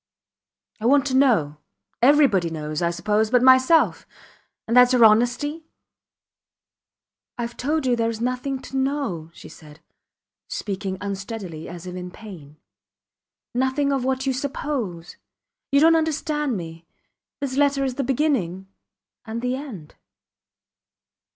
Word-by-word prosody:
I 220 Hz, -, -1 dB
want 280 Hz, +2 st, +4 dB
to 260 Hz, -2 st, -1 dB
know. 215 Hz, -, +3 dB, 0.4 s
Everybody 245 Hz, -, +4 dB
knows, 155 Hz, -1 st, -4 dB
I 170 Hz, -, +2 dB
suppose, 210 Hz, +5 st, 0 dB
but 250 Hz, +1 st, +3 dB
myself 260 Hz, +5 st, +4 dB, 0.6 s
and 230 Hz, -, 0 dB
thats 250 Hz, 0 st, +7 dB
your 240 Hz, -2 st, +6 dB
honesty! 245 Hz, +9 st, +2 dB, 1.7 s
I 240 Hz, -, -2 dB
have 235 Hz, 0 st, -6 dB
told 300 Hz, +3 st, -1 dB
you 250 Hz, -1 st, +2 dB
there 230 Hz, -1 st, 0 dB
is 225 Hz, -1 st, -5 dB
nothing 255 Hz, +3 st, -2 dB
to 270 Hz, -, -6 dB
know, 265 Hz, -, -2 dB
she -, -, -13 dB
said, 150 Hz, -1 st, -15 dB, 0.7 s
speaking 195 Hz, -2 st, -4 dB
unsteadily 195 Hz, -4 st, -6 dB
as 175 Hz, 0 st, -9 dB
if 180 Hz, 0 st, -7 dB
in 180 Hz, 0 st, -6 dB
pain. 175 Hz, -8 st, -12 dB, 1.0 s
Nothing 265 Hz, +3 st, 0 dB
of 270 Hz, -2 st, -1 dB
what 265 Hz, +1 st, -1 dB
you 265 Hz, -, +1 dB
suppose. 255 Hz, -, -4 dB, 0.5 s
You 280 Hz, -, +5 dB
dont 330 Hz, +1 st, +6 dB
understand 300 Hz, -5 st, -1 dB
me. 165 Hz, -1 st, -9 dB, 0.5 s
This 275 Hz, -3 st, -3 dB
letter 280 Hz, -1 st, +2 dB
is 265 Hz, -2 st, -1 dB
the 275 Hz, -, -2 dB
beginning 240 Hz, -, -1 dB, 0.6 s
and 225 Hz, 0 st, -5 dB
the 250 Hz, +1 st, 0 dB
end. 230 Hz, -, -9 dB
245 Hz, 135 wpm, -23 LUFS, 185-275 Hz, 1.7 s, thats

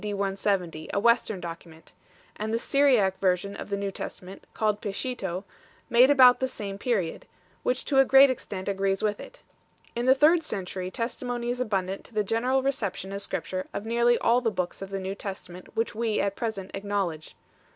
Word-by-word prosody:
170, 195 Hz, -5 st, -1 dB
a -, -, +3 dB
Western 230 Hz, -2 st, +2 dB
document; 165 Hz, -1 st, -10 dB, 0.4 s
and 215 Hz, +1 st, -3 dB
the 225 Hz, -, +1 dB
Syriac 240 Hz, -8 st, +3 dB
version 190 Hz, +1 st, 0 dB
of -, -, -7 dB
the 200 Hz, -, -1 dB
New 200 Hz, 0 st, -2 dB
Testament, 190 Hz, 0 st, -8 dB
called 210 Hz, -1 st, 0 dB
Peshito, 195 Hz, -3 st, -3 dB, 0.5 s
made 245 Hz, +3 st, +7 dB
about 255 Hz, -3 st, +7 dB
the 260 Hz, -, 0 dB
same 200 Hz, -5 st, -6 dB
period, 200 Hz, -9 st, -1 dB, 0.3 s
which 250 Hz, +1 st, -1 dB
to 270 Hz, -, +3 dB
a -, -, +8 dB
great 270 Hz, +1 st, +7 dB
extent 195 Hz, -6 st, -6 dB
agrees 195 Hz, 0 st, 0 dB
with 210 Hz, -1 st, 0 dB
it. -, -, -12 dB, 0.5 s
In 240 Hz, +2 st, -1 dB
the 260 Hz, -, +7 dB
third 315 Hz, +5 st, +5 dB
century 185 Hz, -, -4 dB
testimony 240 Hz, +2 st, -3 dB
is 250 Hz, +1 st, -3 dB
abundant 195 Hz, -4 st, -2 dB
to 230 Hz, -, -18 dB
the 210 Hz, -, +2 dB
general 250 Hz, +6 st, +1 dB
reception 205 Hz, -8 st, -2 dB
as 200 Hz, 0 st, -4 dB
Scripture 185 Hz, -1 st, -4 dB
of 205 Hz, -, -4 dB
nearly 235 Hz, +1 st, +3 dB
all 240 Hz, +2 st, +3 dB
the 235 Hz, -, +1 dB
books 180 Hz, -4 st, -4 dB
of 195 Hz, -, -6 dB
the 195 Hz, 0 st, -3 dB
New 190 Hz, +1 st, -3 dB
Testament 190 Hz, -3 st, -8 dB
which 225 Hz, +1 st, 0 dB
we 225 Hz, 0 st, -1 dB
at 200 Hz, 0 st, 0 dB
present 200 Hz, -5 st, -4 dB
acknowledge. 195 Hz, -6 st, -3 dB
205 Hz, 185 wpm, -27 LUFS, 195-240 Hz, 0.5 s, a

